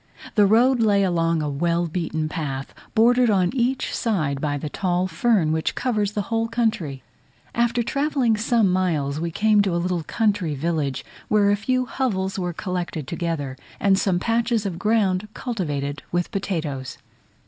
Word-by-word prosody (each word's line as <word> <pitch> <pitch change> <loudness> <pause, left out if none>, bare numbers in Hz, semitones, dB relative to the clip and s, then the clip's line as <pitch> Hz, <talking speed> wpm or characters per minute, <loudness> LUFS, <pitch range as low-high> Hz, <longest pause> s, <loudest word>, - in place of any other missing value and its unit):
The 205 -3 +5
road 245 +5 +4
lay 205 -3 +3
along 165 -3 +1
a - - -1
well 170 +4 0
beaten 160 -2 -2
path, 140 -4 -4 0.2
bordered 245 +2 +5
on 185 -4 +2
each 255 +1 0
side 155 - -1
by 145 -2 -1
the 150 - -4
tall 180 +3 0
fern, 185 -1 +2
which 160 0 -1
covers 210 -5 0
the 205 - -1
whole 225 0 +1
country. 215 - -1 0.5
After 235 0 +1
travelling 275 -3 +1
some 220 -2 +2
miles, 155 -6 0
we 170 +1 -2
came 210 +4 +3
to 195 -4 0
a - - +2
little 175 0 -1
country 200 -3 0
village, 150 -2 -2 0.2
where 205 -1 +3
a - - +4
few 255 +5 0
hovels 195 -8 -2
were 180 -1 -1
collected 175 -3 -4
together, 160 -6 -3 0.2
and 195 -1 +4
some 190 -2 +1
patches 230 +1 0
of 175 -4 -3
ground 210 -2 +1
cultivated 150 - -3
with 175 0 -1
potatoes. 155 -9 -3
185 Hz, 160 wpm, -23 LUFS, 160-225 Hz, 0.5 s, The